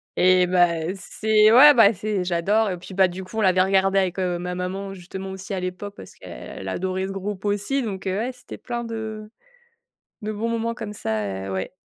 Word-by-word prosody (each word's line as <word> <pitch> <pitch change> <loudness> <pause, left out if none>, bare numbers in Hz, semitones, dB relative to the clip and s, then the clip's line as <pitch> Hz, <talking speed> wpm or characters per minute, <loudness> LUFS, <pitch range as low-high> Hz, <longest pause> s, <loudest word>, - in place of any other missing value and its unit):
Eh 185 0 +4
bah, 175 0 +2
c'est 215 +2 +3
ouais, 280 +6 +9
bah 225 -2 +6
c'est 205 -1 -2
j'adore 190 +4 +1
et 180 - -4
puis 180 +2 -11
bah, 190 -1 +5
du 180 +1 -7
coup, 185 +4 -10
on - - +1
l'avait 185 -2 +4
regardé 195 +1 +3
avec, 185 -1 -1
heu, 180 -2 -1
ma 180 0 -4
maman 190 +2 -4
justement 190 +2 -8
aussi 190 +1 -7
à 190 - -2
l'époque. 185 +3 -5
Parce 95 - -12
qu'elle 95 +9 -9
a - - -2
adoré 185 - -2
ce - - -5
groupe 195 0 -5
aussi 205 +7 0
donc 195 -4 -5
heu, 190 +1 -1
ouais 240 +4 -2
c'était 250 0 -11
plein 240 -1 -5
de 220 -2 -6 0.9
de 215 0 -4
bons 215 +2 -3
moments 230 0 -1
comme 210 -3 -6
ça 105 - -3
heu, - - -5
ouais. 95 0 -3
195 Hz, 215 wpm, -23 LUFS, 180-215 Hz, 0.9 s, ouais